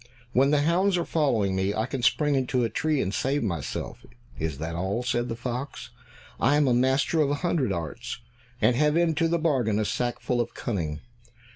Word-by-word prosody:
"When 135 +3 +4
the 145 -1 +3
hounds 180 +4 +2
are 170 - -1
following 115 - +1
me, 95 +2 0
I 110 - 0
can 130 0 -4
spring 150 +4 +2
into 130 -2 +1
a 115 - -1
tree 155 +4 0
and 95 - -3
save 135 +4 0
myself." 85 -9 -4 0.4
"Is 80 -3 -2
that 80 +3 -4
all?" 95 +7 -2
said 120 0 -1
the 115 - -2
fox. 125 +3 -5 0.5
"I 135 +5 +3
am 130 -5 +3
master 135 +5 +2
of 145 - +2
a 145 - +1
hundred 145 - +1
arts, 95 +9 -4 0.4
and 115 +3 +3
have 150 +4 +3
into 165 -1 +2
the 170 +1 +1
bargain 130 -10 +1
a 110 - +1
sackful 120 +2 -1
of 120 - -5
cunning. 80 -10 -3
125 Hz, 190 wpm, -26 LUFS, 105-150 Hz, 0.5 s, When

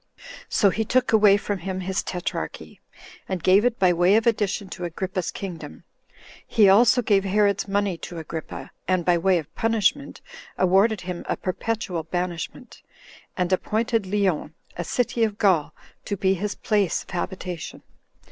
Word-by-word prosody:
So 200 -3 +3
he 220 - -1
took 245 +1 +1
away 210 -2 +6
from 205 -1 -3
him 185 +1 -4
his 190 +1 -1
tetrarchy, 180 -1 -5 0.5
and 185 -4 -3
gave 190 +3 +5
it 245 -1 +1
by 185 -2 +4
way 175 +4 +4
of 225 - +2
addition 210 -3 0
to 180 - -7
Agrippa's 180 +1 -3
kingdom; 180 -2 -7 0.6
he 215 -4 +4
also 235 +5 +5
gave 200 -3 +3
Herod's 200 0 +1
money 200 -3 -1
to 175 - -8
Agrippa, 160 0 -7 0.2
and, 185 -2 +1
by 175 -1 +3
way 185 +1 +3
of 155 -4 -6
punishment, 225 +5 0 0.4
awarded 195 +3 +3
him 180 -1 -5
a - - 0
perpetual 185 -2 -3
banishment, 175 +1 -5 0.6
and 180 0 0
appointed 220 +2 0
Lyons, 190 -6 0 0.3
a 175 - -3
city 235 +4 0
of 210 -2 0
Gaul, 185 -9 +2 0.3
to 200 - -3
be 190 +1 +2
his 205 +3 -3
place 205 -5 0
of - - -16
habitation. 180 -2 -5
190 Hz, 155 wpm, -24 LUFS, 180-210 Hz, 0.6 s, away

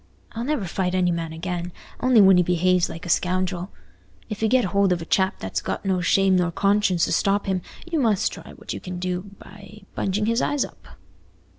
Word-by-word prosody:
I'll 230 - -5
never 270 -6 -1
fight 180 +1 -2
any 180 -1 +2
man 165 -1 -3
again, 175 +1 -4 0.3
only 250 -3 +5
when 190 -2 +7
he - - +5
behaves 180 +1 +2
like 165 +3 -8
a - - -6
scoundrel. 180 +1 0 0.6
If 215 - -6
you 220 - +3
get 250 +1 +3
hold 200 -1 +3
of 180 - +1
a 165 - -7
chap 190 +2 +1
that's 95 -2 -4
got - - -4
no 185 -2 +1
shame 190 +2 +3
nor 175 -1 +1
conscience 195 -2 +2
to - - -4
stop 200 +1 +1
him, 190 -2 -1 0.2
you 340 -2 -1
must 220 -7 +2
try - - -10
what - - -7
you - - -5
can 180 -1 -7
do 180 +2 -3
by 205 +2 -14
bunging 200 +2 -1
his 230 +2 +1
eyes 290 -1 0
up." - - -16
185 Hz, 210 wpm, -23 LUFS, 180-205 Hz, 0.6 s, when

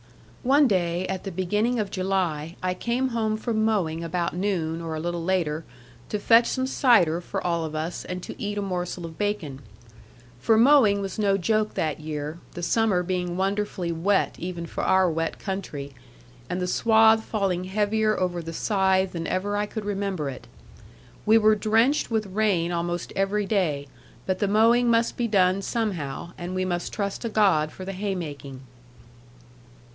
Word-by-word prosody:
One 275 +3 +4
day 180 -3 0
at 190 -1 -4
the 195 - -5
beginning 210 +7 0
of 205 -2 -2
July, 180 -4 -1
I 185 0 +1
came 240 +7 -1
home 220 -2 -1
from 220 -1 -1
mowing 175 -7 0
about 170 0 -2
noon, 175 -4 -1
or 165 -1 -4
a - - -3
little 170 +1 -3
later, 165 -4 0 0.5
to 210 - -1
fetch 230 +3 +5
some 260 -1 -1
cider 205 - +3
for 195 +2 -5
all 170 -2 0
of 155 -1 -5
us, 160 +3 -3
and 180 0 -6
to - - -8
eat 205 0 -3
a 205 - -1
morsel 180 -2 -3
of 160 -1 -10
bacon. 205 -10 -2 0.8
For 220 - +3
mowing 230 -5 +5
was 195 +1 -5
no 200 -2 +3
joke 215 +3 0
that 155 -1 -1
year, 155 +1 -5
the 175 - -6
summer 205 -2 +2
being 180 -1 -2
wonderfully 195 -2 -1
wet 190 +5 +1
(even 175 -1 -5
for - - -5
our 190 -1 +4
wet 165 0 -2
country), 155 -8 -5 0.6
and 180 - -2
the 180 - -1
swathe 220 +3 +4
falling 195 -5 -1
heavier 215 +2 +1
over 175 -2 -1
the 165 0 -7
scythe 190 0 +1
than 165 -1 -4
ever 200 +3 -1
I 205 0 0
could 215 -1 -6
remember 195 -6 -2
it. 130 - -11 0.8
We 220 +1 +7
were 215 -1 +5
drenched 225 +7 +2
with 220 -2 0
rain 190 -4 0
almost 175 0 -3
every 200 +2 0
day; 165 -9 0 0.4
but 185 -1 -1
the 205 - +1
mowing 230 +4 +4
must 230 0 +2
be 240 - -1
done 190 -2 +3
somehow; 185 - -3
and 180 +1 -5
we 185 0 0
must 175 -1 -2
trust 200 -2 -3
to 230 - -3
God 185 -9 +3
for 185 - -9
the 195 - -4
haymaking. 155 -9 -5
190 Hz, 175 wpm, -25 LUFS, 170-215 Hz, 0.8 s, We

